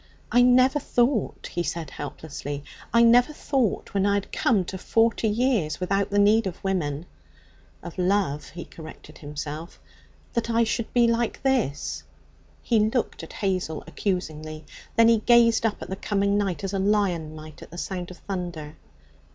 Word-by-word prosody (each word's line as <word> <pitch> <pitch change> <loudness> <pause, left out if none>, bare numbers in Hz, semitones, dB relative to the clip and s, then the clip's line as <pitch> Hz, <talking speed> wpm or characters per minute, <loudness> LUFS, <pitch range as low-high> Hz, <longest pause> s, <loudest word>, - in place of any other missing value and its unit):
'I 245 - +5
never 255 +3 +5
thought,' 240 -4 0
he 175 - 0
said 170 -3 -4
helplessly 145 0 -6 0.3
'I 235 0 +5
never 240 +5 +6
thought, 270 -7 -1
when 195 -1 +1
I 200 - +3
had 200 - -3
come 205 -7 +2
to 190 +1 -6
forty 225 +3 +2
years 215 - +1
without 195 +2 0
the 205 - 0
need 205 +1 +4
of 180 - -7
women' 165 -5 -1 0.8
('of 175 +1 -8
love,' 180 -5 0
he 175 +1 -8
corrected 155 -1 -12
himself), 150 +2 -7 0.5
'that 235 0 -1
I 230 0 +3
should 225 0 -2
be 240 -1 +4
like 230 0 0
this.' 250 - 0 0.6
He 230 -2 +2
looked 220 +3 0
at - - -10
Hazel 185 -5 -1
accusingly; 155 -5 -4 0.3
then 230 0 +6
he 230 -1 +5
gazed 230 0 +5
up 215 - -4
at - - -9
the - - -1
coming 200 0 0
night 200 -3 -1
as 195 0 -3
a 195 - 0
lion 190 -6 +1
might 155 -1 -11
at - - -11
the 175 - -10
sound 180 0 -4
of 180 - -10
thunder. 175 -5 -6
195 Hz, 165 wpm, -25 LUFS, 165-230 Hz, 0.8 s, never